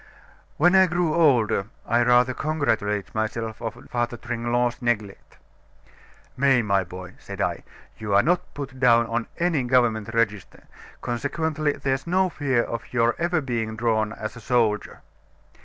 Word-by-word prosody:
"When 175 +4 +4
I 190 -1 +6
grew 175 -2 0
older, 125 - +3 0.2
I 120 +1 +2
rather 125 +1 +4
congratulated 125 -10 -1
myself 110 0 -3
on 115 +2 -6
Father 120 -1 -1
Tringlot's 120 +1 -1
neglect. 110 -5 -3 1.0
'May, 130 -2 +3
my 100 -2 +2
boy,' 90 0 -9
said - - -9
I, - - -1 0.4
'you 105 -2 -1
are 100 - +5
not 175 +2 0
put 135 -2 -7
down 120 -2 +5
on 115 0 -2
any 170 -5 +1
government 120 -4 +1
register, 105 -4 -1 0.4
consequently 150 +4 -1
there's 135 0 -2
no 185 +2 +2
fear 135 -7 0
of 115 0 -6
your 120 -1 +2
ever 170 -1 +1
being 115 -4 -3
drawn 110 -2 0
as 110 0 -6
a 120 - -10
soldier. 110 -3 0
120 Hz, 145 wpm, -24 LUFS, 110-140 Hz, 1.0 s, I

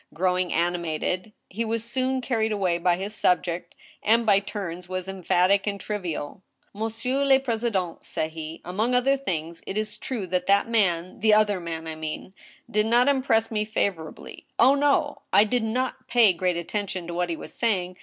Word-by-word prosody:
Growing 180 +1 +1
animated, 175 +3 -1 0.2
he 225 +5 -3
was 225 0 -2
soon 260 +2 -1
carried 225 -3 0
away 185 -5 +1
by 175 0 +3
his 200 +3 -4
subject, 175 -3 0 0.3
and 230 +2 +3
by 200 -3 +5
turns 190 -4 -6
was 185 0 -4
em 190 -1 -6
phatic 195 +4 +3
and 200 -1 -1
trivial. 185 -5 -4 0.3
M<msi€ur 225 +6 -1
le 270 -1 +6
president,'* 225 -8 -2
said 155 0 -3
he, 160 0 -7
among 215 +8 0
other 265 +2 +3
things, 170 - -4
"it 195 - -3
is 215 -1 -3
true 235 -7 -4
that 180 0 -1
that 200 +2 +4
man— 185 -6 +1
the 215 0 +5
other 210 -2 +3
man 165 -1 -5
I 160 - -4
mean 155 +4 -6 0.2
— - - -24
did 210 +1 +3
not 240 +3 +4
impress 255 -5 +2
me 210 -1 0
fa« 215 -1 +1
vorably.... 160 -4 -11
Oh, 255 +4 +6
no!... 290 +1 +1
I 205 - +7
did 240 +3 0
not 250 +4 -2
pay 230 -5 +5
great 180 0 0
attention 185 0 -3
to 170 - -6
what 175 0 -1
he 165 - -1
was - - -9
saying 185 -6 0
200 Hz, 190 wpm, -25 LUFS, 175-225 Hz, 0.3 s, I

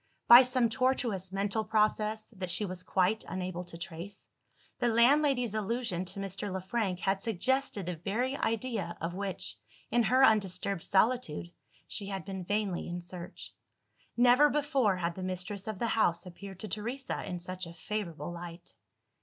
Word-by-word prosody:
By 240 +1 +12
some 250 -1 +2
tortuous 230 -6 0
mental 200 +3 0
process, 215 +1 0
that 185 -2 -4
she 185 +4 +3
was 185 -1 -5
quite 190 +3 +1
unable 180 -1 -4
to 170 - -9
trace, 170 +3 -8 0.5
the 240 - +2
landlady's 250 0 +4
allusion 215 -3 -1
to 190 - -5
Mr. 195 +1 -4
Le 190 - -2
Frank 190 -1 -2
had 195 0 +1
suggested 230 0 0
the 175 -1 -3
very 230 - -1
idea 225 -8 -2
of 165 +1 -3
which, 190 - -4 0.3
in 240 +2 +4
her 255 +3 +5
undisturbed 195 -4 +2
solitude, 195 -6 +1 0.4
she 200 - -3
had 195 -1 -4
been 190 -1 -5
vainly 200 -1 -1
in 175 +1 -4
search. 175 0 -8 0.6
Never 250 +5 +6
before, 275 -10 +2
had 170 -1 -1
the 185 - -7
mistress 185 +2 -3
of 215 -2 -3
the 230 +4 -1
house 175 -6 +2
appeared 190 +1 -10
to 215 - -4
Teresa 235 +7 -4
in 180 - -4
such 185 +1 -5
a 170 - -9
favourable 175 -3 -4
light. 175 0 -9
200 Hz, 160 wpm, -31 LUFS, 180-230 Hz, 0.6 s, By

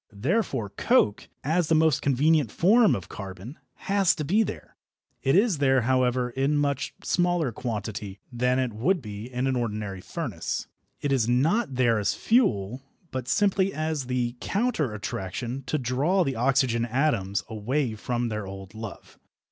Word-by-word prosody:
Therefore 130 - -1
coke, 100 +1 +2
as 160 +3 +1
the 160 - +3
most 155 -3 +3
convenient 140 -1 +2
form 215 +5 +4
of 90 -3 -6
carbon, 100 - -8 0.3
has 195 -2 +3
to 155 - -3
be 200 +9 +3
there. 220 - -5 0.5
It 135 - +2
is 200 -5 +3
there, 135 -2 +4
however, 125 0 +1
in 135 +4 +1
much 140 -2 -1
smaller 175 -6 +1
quantity 105 -3 -5
than 125 +1 +1
it 130 -3 0
would 170 - +1
be 105 -1 -8
in 125 +1 -1
an 135 -1 +1
ordinary 105 -5 -3
furnace. - - -4 0.4
It 145 - -1
is 125 -4 +2
not 150 - +2
there 120 -3 +3
as 105 - 0
fuel, 125 - +1 0.3
but 130 -2 -4
simply 195 +5 +2
as 155 -4 -2
the 125 -1 -1
"counter 200 - 0
attraction" 115 +6 -4
to 155 - 0
draw 140 +9 +1
the 135 -4 -2
oxygen 125 -1 +2
atoms 115 -6 0
away 120 +4 -1
from 120 +2 -2
their 105 -2 -4
old 95 0 -9
love. 110 -1 -9
130 Hz, 155 wpm, -26 LUFS, 110-155 Hz, 0.5 s, form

